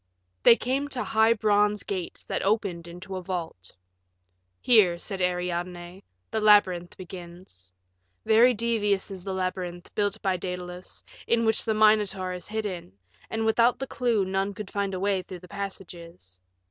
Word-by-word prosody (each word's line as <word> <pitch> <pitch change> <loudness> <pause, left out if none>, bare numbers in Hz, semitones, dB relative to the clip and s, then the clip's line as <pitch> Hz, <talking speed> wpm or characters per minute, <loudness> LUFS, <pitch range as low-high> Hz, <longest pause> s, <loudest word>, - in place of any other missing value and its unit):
They 230 - +8
came 265 +4 -1
to 260 -3 -3
high 220 +1 +4
bronze 210 -1 +2
gates 185 -3 -5
that - - -2
opened 195 -5 -1
into 185 +3 -7
a - - -5
vault. 170 - -6 0.9
"Here," 205 -8 +5
said 190 +2 -5
Ariadne, 180 +1 -3 0.3
"the 220 - -1
labyrinth 185 -5 +4
begins. 175 - -11 0.5
Very 235 +3 +5
devious 210 -3 0
is 190 -2 -8
the 195 0 -4
labyrinth, 185 -1 -4
built 205 0 -1
by 190 -2 +1
Daedalus, 180 0 -7 0.2
in 230 -1 +2
which 220 0 +1
the 220 -1 +1
Minotaur 210 -4 +3
is 180 -1 -8
hidden, 205 - -4 0.4
and 225 0 -2
without 230 +2 +3
the 270 - -3
clue 235 -6 0
none 195 +1 -1
could 210 -1 -7
find 200 -1 -2
a - - -3
way 195 -1 +1
through 180 -1 -10
the 180 - -13
passages. 175 - -8
195 Hz, 155 wpm, -26 LUFS, 180-215 Hz, 0.9 s, They